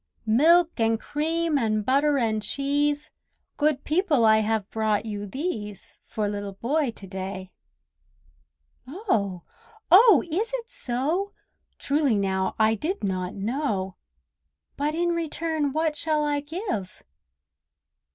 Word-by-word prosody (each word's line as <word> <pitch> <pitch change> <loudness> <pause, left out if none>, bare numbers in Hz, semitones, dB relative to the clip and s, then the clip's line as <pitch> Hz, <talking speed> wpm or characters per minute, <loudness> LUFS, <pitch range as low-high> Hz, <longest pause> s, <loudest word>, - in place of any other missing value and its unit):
"Milk 320 +8 +4
and 225 0 +2
cream 320 +2 -1
and 215 -3 0
butter 280 +3 +3
and 220 -4 0
cheese, 290 +4 0 0.5
Good 295 -2 +1
people, 310 - +2
I 220 0 +6
have 220 -2 0
brought 220 -1 0
you 205 -2 -5
these 210 - -5
For 215 -1 -2
Little 205 -1 -4
Boy 275 +7 0
to 215 -3 -9
day." 190 0 -6 1.4
Oh! 225 - -1 0.5
oh! 420 +3 +8
is 380 +8 -1
it 475 -1 -7
so? 310 +12 -2 0.4
Truly 280 -4 +1
now, 190 -1 0
I 220 0 +4
did 310 - -3
not 185 -2 -2
know! 205 -4 -2 0.8
But 295 +2 -1
in 345 +1 +1
return 320 -3 -1
what 310 +1 0
shall 305 -1 0
I 290 -1 0
give? 290 - -5
275 Hz, 120 wpm, -25 LUFS, 210-315 Hz, 1.4 s, oh